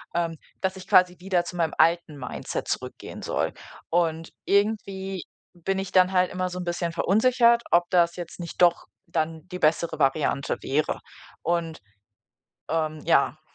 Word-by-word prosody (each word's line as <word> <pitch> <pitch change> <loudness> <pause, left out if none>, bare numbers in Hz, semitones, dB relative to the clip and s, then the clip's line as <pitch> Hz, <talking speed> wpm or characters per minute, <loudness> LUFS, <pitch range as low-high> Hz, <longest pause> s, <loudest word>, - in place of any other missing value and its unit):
ähm, 165 -2 -1 0.2
dass 190 0 -1
ich 185 - -11
quasi 180 -1 +5
wieder 180 -1 +1
zu 175 +1 -7
meinem 165 -2 0
alten 165 -2 +3
Mindset 125 -2 -5
zurückgehen - - -5
soll. - - -1 0.4
Und 165 -1 0
irgendwie 195 -2 0 0.3
bin 185 +3 -2
ich 195 -1 -4
dann 185 0 +4
halt 180 -1 +3
immer 185 0 -1
so 180 0 -6
'n - - -3
bisschen 170 -1 -2
verunsichert, 235 +5 +4
ob 175 0 +4
das 170 -2 +3
jetzt 175 0 -8
nicht 170 0 -6
doch 175 -1 +4 0.2
dann 160 +1 -2
die 180 0 -6
bessere 160 +1 +1
Variante 140 0 +1
wäre. 150 +3 0 0.4
Und, 165 -4 -1 0.9
ähm, 155 -1 -1
ja. 155 -1 +2
175 Hz, 155 wpm, -25 LUFS, 165-185 Hz, 0.9 s, quasi